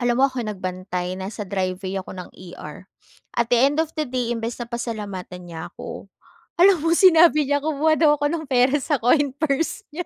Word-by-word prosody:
Alam 240 Hz, -1 st, +1 dB
mo, 270 Hz, -, +4 dB
ako 260 Hz, -1 st, -5 dB
nagbantay, 185 Hz, -2 st, -4 dB
nasa 200 Hz, +2 st, -6 dB
driveway 190 Hz, 0 st, -3 dB
ako 185 Hz, -, -10 dB
ng 180 Hz, -, -8 dB
ER. 180 Hz, 0 st, -11 dB, 0.5 s
At 235 Hz, -1 st, +1 dB
the -, -, +6 dB
end 280 Hz, +3 st, +3 dB
of 320 Hz, 0 st, -2 dB
the 305 Hz, -, 0 dB
day, 245 Hz, -2 st, -1 dB
imbes 230 Hz, 0 st, -4 dB
na -, -, -2 dB
pasalamatan 205 Hz, -7 st, -6 dB
niya 160 Hz, -1 st, -7 dB
ako, -, -, -9 dB, 0.5 s
alam 375 Hz, 0 st, +7 dB
mo 330 Hz, 0 st, +3 dB
sinabi 325 Hz, -6 st, +6 dB
niya 285 Hz, 0 st, 0 dB
kumuha 310 Hz, +1 st, +2 dB
daw 300 Hz, -2 st, +5 dB
ako 290 Hz, -, +2 dB
ng 320 Hz, -2 st, -3 dB
pera 255 Hz, +1 st, +3 dB
sa 290 Hz, +2 st, 0 dB
coin 275 Hz, +2 st, +3 dB
purse 315 Hz, +5 st, -1 dB
nya. 345 Hz, +2 st, -5 dB
245 Hz, 195 wpm, -22 LUFS, 190-300 Hz, 0.5 s, alam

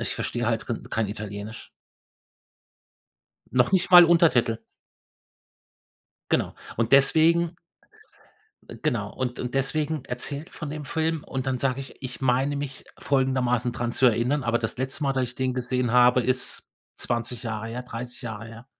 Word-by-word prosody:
ich -, -, -2 dB
verstehe 120 Hz, -1 st, -2 dB
halt 115 Hz, -1 st, -1 dB
rin 115 Hz, -, -3 dB
kein 110 Hz, -2 st, 0 dB
Italienisch. 105 Hz, +1 st, -7 dB, 1.8 s
Noch 125 Hz, +3 st, +3 dB
nicht 185 Hz, -2 st, +2 dB
mal 175 Hz, -1 st, +11 dB
Untertitel. 160 Hz, -10 st, +3 dB, 1.7 s
Genau. -, -, +1 dB, 0.2 s
Und 115 Hz, 0 st, 0 dB
deswegen 165 Hz, +4 st, +4 dB, 1.1 s
Äh, -, -, -9 dB
genau. 120 Hz, -9 st, -1 dB
Und 125 Hz, -1 st, -3 dB
und 125 Hz, 0 st, -4 dB
deswegen 150 Hz, +1 st, -1 dB
erzähle 140 Hz, +4 st, -5 dB
ich -, -, -20 dB
von 150 Hz, -, -6 dB
dem 150 Hz, 0 st, -6 dB
Film 160 Hz, +2 st, -1 dB
und 130 Hz, -1 st, -4 dB
dann 130 Hz, -1 st, 0 dB
sage 130 Hz, 0 st, 0 dB
ich, 135 Hz, -, -9 dB
ich 130 Hz, 0 st, -7 dB
meine 130 Hz, +3 st, +2 dB
mich 140 Hz, -1 st, -5 dB
folgendermaßen 130 Hz, -3 st, +1 dB
dran 120 Hz, 0 st, -3 dB
zu 130 Hz, -, +2 dB
erinnern, 125 Hz, +4 st, +2 dB
aber 120 Hz, 0 st, +1 dB
das 115 Hz, +1 st, -3 dB
letzte 130 Hz, +4 st, -3 dB
Mal, 135 Hz, -1 st, +1 dB
dass 130 Hz, -1 st, +1 dB
ich 125 Hz, 0 st, -5 dB
den 130 Hz, -1 st, -1 dB
gesehen 125 Hz, -1 st, -1 dB
habe, 125 Hz, +1 st, +5 dB
ist 130 Hz, +1 st, -1 dB, 0.3 s
20 120 Hz, +1 st, -2 dB
Jahre 110 Hz, -1 st, -4 dB
her, 120 Hz, +2 st, -5 dB
30 125 Hz, +1 st, -7 dB
Jahre 110 Hz, -2 st, -6 dB
her. 115 Hz, +2 st, -11 dB
125 Hz, 160 wpm, -25 LUFS, 120-140 Hz, 1.8 s, mal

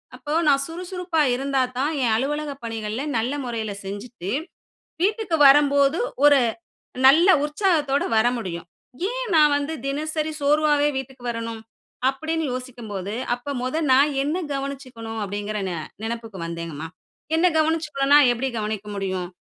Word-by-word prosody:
அப்ப 295 Hz, +4 st, -4 dB
நான் 275 Hz, -1 st, +4 dB
சுறுசுறுப்பா 355 Hz, -1 st, -2 dB
இருந்தாத்தான் 265 Hz, +1 st, 0 dB
என் 230 Hz, -3 st, +2 dB
அலுவலக 295 Hz, +5 st, -1 dB
பணிகள்ல 225 Hz, +1 st, -4 dB, 0.2 s
நல்ல 235 Hz, +5 st, -1 dB
முறையில 225 Hz, -4 st, -3 dB
செஞ்சுட்டு, 205 Hz, 0 st, -6 dB, 0.7 s
வீட்டுக்கு 415 Hz, -2 st, +1 dB
வரம்போது 280 Hz, +2 st, +5 dB, 0.3 s
ஒரு 290 Hz, -1 st, +7 dB, 0.7 s
நல்ல 320 Hz, +7 st, +6 dB, 0.2 s
உற்சாகத்தோட 300 Hz, -4 st, +1 dB
வர 220 Hz, -, +4 dB
முடியும். 170 Hz, -6 st, -6 dB, 0.4 s
"ஏன் -, -, -3 dB
நான் 300 Hz, -2 st, +6 dB
வந்து 290 Hz, +2 st, -3 dB
தினசரி 310 Hz, +2 st, -2 dB
சோர்வாவே 295 Hz, 0 st, +3 dB
வீட்டுக்கு 265 Hz, -1 st, -7 dB
வரணும்?" 230 Hz, -1 st, -5 dB, 0.5 s
அப்படின்னு 315 Hz, +4 st, -2 dB
யோசிக்கும்போது, 225 Hz, -6 st, -6 dB, 0.2 s
"அப்ப 245 Hz, +4 st, -6 dB
முத 255 Hz, +5 st, -2 dB, 0.2 s
நான் 285 Hz, +3 st, +5 dB
என்னை 310 Hz, +6 st, -1 dB
கவனிச்சுக்கணும்." 255 Hz, -5 st, -6 dB
அப்படிங்கிற 205 Hz, +2 st, -4 dB
நெ 175 Hz, -, -3 dB, 0.3 s
நெனைப்புக்கு 225 Hz, -3 st, -5 dB
வந்தேங்கம்மா. 165 Hz, -2 st, -5 dB, 0.5 s
என்னை 360 Hz, +2 st, +4 dB
கவனிச்சுக்கணும்னா, 305 Hz, -3 st, +3 dB
எப்படி 250 Hz, +3 st, -2 dB
கவனிக்க 210 Hz, -1 st, -4 dB
முடியும்? 190 Hz, -2 st, -3 dB
270 Hz, 125 wpm, -23 LUFS, 225-300 Hz, 0.7 s, ஒரு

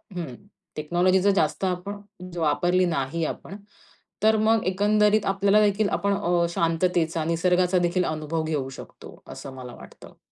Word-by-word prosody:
हं. 165 Hz, -8 st, -5 dB, 0.4 s
टेक्नॉलॉजी 175 Hz, +5 st, +2 dB
जर 200 Hz, +1 st, +4 dB
जास्त 155 Hz, -1 st, 0 dB
आपण 190 Hz, +3 st, -3 dB, 0.4 s
वापरली 175 Hz, +3 st, +2 dB
नाही 165 Hz, -1 st, -2 dB
आपण, 195 Hz, -, -6 dB, 0.7 s
तर 220 Hz, 0 st, +4 dB
मग 220 Hz, 0 st, +2 dB
एकंदरीत 210 Hz, +2 st, +2 dB
आपल्यालादेखील 200 Hz, +1 st, +2 dB
आपण 200 Hz, 0 st, 0 dB
अ, 175 Hz, -3 st, +1 dB
शांततेचा, 165 Hz, -1 st, 0 dB
निसर्गाचा 180 Hz, +2 st, +2 dB
देखील 180 Hz, +1 st, 0 dB
अनुभव 155 Hz, +1 st, -2 dB
घेऊ 150 Hz, -4 st, -2 dB
शकतो -, -, -12 dB
असं 135 Hz, -, -9 dB
मला 125 Hz, -1 st, -9 dB
वाटतं. -, -, -15 dB
180 Hz, 135 wpm, -25 LUFS, 160-200 Hz, 0.7 s, जर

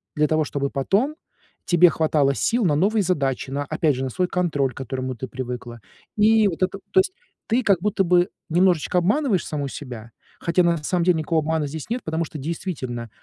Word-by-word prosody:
для 150 Hz, 0 st, +3 dB
того, 155 Hz, 0 st, +1 dB
чтобы 140 Hz, -1 st, -2 dB
потом 205 Hz, -, 0 dB, 0.5 s
тебе 175 Hz, 0 st, +6 dB
хватало 150 Hz, -4 st, +2 dB
сил 235 Hz, -, +1 dB
на 150 Hz, -4 st, +3 dB
новые 205 Hz, +6 st, +2 dB
задачи, 135 Hz, -8 st, -1 dB
на, 145 Hz, +1 st, -2 dB
опять 155 Hz, -2 st, +1 dB
же, 130 Hz, -, -3 dB
на 130 Hz, -, -2 dB
свой 180 Hz, +8 st, -1 dB
контроль, 150 Hz, -9 st, 0 dB
к -, -, -20 dB
которому 130 Hz, 0 st, -4 dB
ты 130 Hz, +3 st, -6 dB
привыкла. 125 Hz, -2 st, -6 dB, 0.3 s
И 215 Hz, 0 st, +5 dB
вот 185 Hz, 0 st, -2 dB
это 190 Hz, +1 st, -1 dB
то 380 Hz, -, +5 dB
есть 375 Hz, 0 st, -5 dB, 0.3 s
ты 235 Hz, +3 st, +1 dB
как 195 Hz, -5 st, +3 dB
будто 205 Hz, -1 st, +1 dB
бы 180 Hz, +2 st, +3 dB, 0.2 s
немножечко 180 Hz, 0 st, +2 dB
обманываешь 210 Hz, -, +1 dB
саму 145 Hz, -2 st, -3 dB
себя, 120 Hz, -5 st, -8 dB, 0.3 s
хотя 175 Hz, +1 st, +2 dB
на 170 Hz, -1 st, +2 dB
самом 170 Hz, +3 st, -1 dB
деле 175 Hz, -2 st, +3 dB
никакого 160 Hz, 0 st, 0 dB
обмана 155 Hz, -1 st, -1 dB
здесь 155 Hz, +7 st, -7 dB
нет, 240 Hz, +1 st, -2 dB
потому 160 Hz, +1 st, -1 dB
что 155 Hz, -, -8 dB
действительно, 135 Hz, -, -4 dB
160 Hz, 200 wpm, -23 LUFS, 140-185 Hz, 0.5 s, тебе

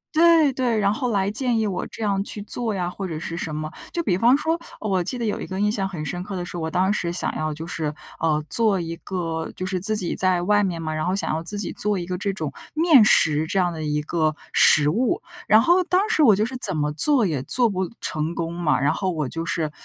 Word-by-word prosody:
对 325 Hz, -4 st, +5 dB
对， 245 Hz, -3 st, 0 dB
然 200 Hz, -1 st, +2 dB
后 250 Hz, +3 st, -2 dB
来 200 Hz, -3 st, 0 dB
建 240 Hz, +1 st, +1 dB
议 220 Hz, -, 0 dB
我 195 Hz, -3 st, -3 dB
这 225 Hz, -, -8 dB
样 195 Hz, -1 st, 0 dB
去 210 Hz, -, -4 dB
做 225 Hz, 0 st, -2 dB
呀， 180 Hz, -2 st, -2 dB
或 190 Hz, +2 st, -5 dB
者 165 Hz, -3 st, -5 dB
是 165 Hz, +1 st, -6 dB
什 160 Hz, -2 st, -4 dB
么。 155 Hz, 0 st, -5 dB, 0.2 s
就 340 Hz, -, -2 dB
比 185 Hz, -, +1 dB
方 235 Hz, +8 st, +4 dB
说 325 Hz, +3 st, -1 dB, 0.2 s
我 190 Hz, -4 st, -1 dB
记 250 Hz, -, -4 dB
得 235 Hz, -, -3 dB
有 210 Hz, -, -2 dB
一 -, -, -6 dB
个 190 Hz, +1 st, -5 dB
印 210 Hz, +1 st, +1 dB
象 195 Hz, -3 st, -2 dB
很 155 Hz, -5 st, -6 dB
深 175 Hz, +4 st, -4 dB
刻 195 Hz, +1 st, -6 dB
的 180 Hz, -1 st, -4 dB
是， 175 Hz, -, -8 dB
我 160 Hz, -2 st, -3 dB
当 185 Hz, +4 st, +1 dB
时 175 Hz, -5 st, -2 dB
想 175 Hz, -, -2 dB
要 155 Hz, 0 st, -2 dB
就 155 Hz, +2 st, -7 dB
是， 160 Hz, -3 st, -3 dB, 0.3 s
呃， 155 Hz, -2 st, 0 dB
做 215 Hz, -2 st, +1 dB
一 165 Hz, -1 st, -5 dB
个 165 Hz, -3 st, -4 dB
就 185 Hz, -, -5 dB
是 185 Hz, 0 st, -2 dB
自 215 Hz, +4 st, +3 dB
己 185 Hz, -5 st, -1 dB
在 185 Hz, -2 st, +2 dB
外 205 Hz, +2 st, +2 dB
面 180 Hz, -4 st, -2 dB
嘛， 155 Hz, -1 st, -4 dB
然 155 Hz, 0 st, -2 dB
后 180 Hz, +1 st, 0 dB
想 200 Hz, -, -2 dB
要 160 Hz, -, -2 dB
自 190 Hz, +5 st, -4 dB
己 205 Hz, -, -3 dB
做 210 Hz, -1 st, +1 dB
一 175 Hz, -, -4 dB
个 180 Hz, +1 st, -4 dB
这 200 Hz, 0 st, -1 dB
种 155 Hz, -7 st, -5 dB, 0.2 s
面 315 Hz, -6 st, +6 dB
食 155 Hz, -6 st, +4 dB
这 195 Hz, -, -2 dB
样 180 Hz, -2 st, +1 dB
的 160 Hz, -1 st, -6 dB
一 150 Hz, 0 st, -2 dB
个 155 Hz, -1 st, -1 dB, 0.2 s
食 150 Hz, -2 st, +6 dB
物。 255 Hz, -, 0 dB, 0.2 s
然 215 Hz, -, +6 dB
后 355 Hz, +5 st, +4 dB
当 370 Hz, +3 st, +1 dB
时 315 Hz, -, +2 dB
我 225 Hz, -9 st, +6 dB
就 210 Hz, +3 st, 0 dB
是 255 Hz, +3 st, -6 dB
怎 210 Hz, -, +2 dB
么 150 Hz, 0 st, -1 dB
做 245 Hz, -, +4 dB
也 155 Hz, -8 st, -2 dB
做 240 Hz, -, +4 dB
不 190 Hz, -4 st, -2 dB
成 155 Hz, +2 st, -3 dB
功 165 Hz, 0 st, -3 dB
嘛， 160 Hz, -4 st, +1 dB
然 140 Hz, +2 st, +1 dB
后 190 Hz, -, -2 dB
我 155 Hz, -6 st, -2 dB
就 165 Hz, +5 st, -5 dB
是， 160 Hz, -2 st, -2 dB
185 Hz, 285 characters per minute, -22 LUFS, 165-215 Hz, 0.3 s, 面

